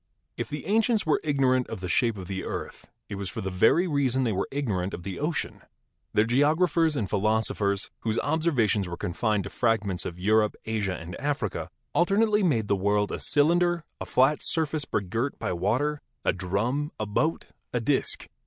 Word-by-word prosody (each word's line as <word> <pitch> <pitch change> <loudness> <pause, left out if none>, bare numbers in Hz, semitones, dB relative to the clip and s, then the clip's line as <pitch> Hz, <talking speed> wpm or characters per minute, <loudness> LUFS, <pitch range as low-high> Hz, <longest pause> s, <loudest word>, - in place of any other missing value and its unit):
If - - -4
the 150 -1 -5
ancients 220 +3 +2
were 155 - +2
ignorant 130 -4 +2
of - - -6
the 90 - -4
shape 115 +5 +1
of 95 -2 -7
the 95 -1 -4
earth, - - -6 0.2
it 100 -2 -6
was 95 - -3
for - - -5
the 95 - -3
very 115 - +4
reason 135 -4 +1
that 120 - +1
they - - 0
were 95 - -1
igno 135 -10 -1
rant 90 +2 -3
of 85 - -10
the 95 0 -5
ocean. 150 -2 -2 0.5
Their 105 - +3
geographers 155 +5 +3
and 110 -8 -1
philosophers, 105 -1 0
whose 110 0 -1
observations 145 - +1
were 85 -1 -5
confined 105 +3 0
to 100 - -7
fragments 105 -6 0
of 85 - -7
Europe, 105 +3 +2
Asia 105 -4 -1
and 85 +2 -8
Africa, 140 -9 -2 0.2
alternately 210 +4 +3
made 125 - +2
the 100 - +2
world 100 +1 +1
a - - -3
cylinder, 170 +3 +2 0.2
a - - -6
flat 135 +4 +3
surface 155 -3 0
begirt 115 +7 -2
by - - -2
water, 125 +12 0 0.2
a - - +3
drum, 120 - -1
a 110 - -1
boat, 155 +10 0 0.3
a 125 - 0
disk. 135 +4 -1
115 Hz, 190 wpm, -27 LUFS, 100-150 Hz, 0.5 s, very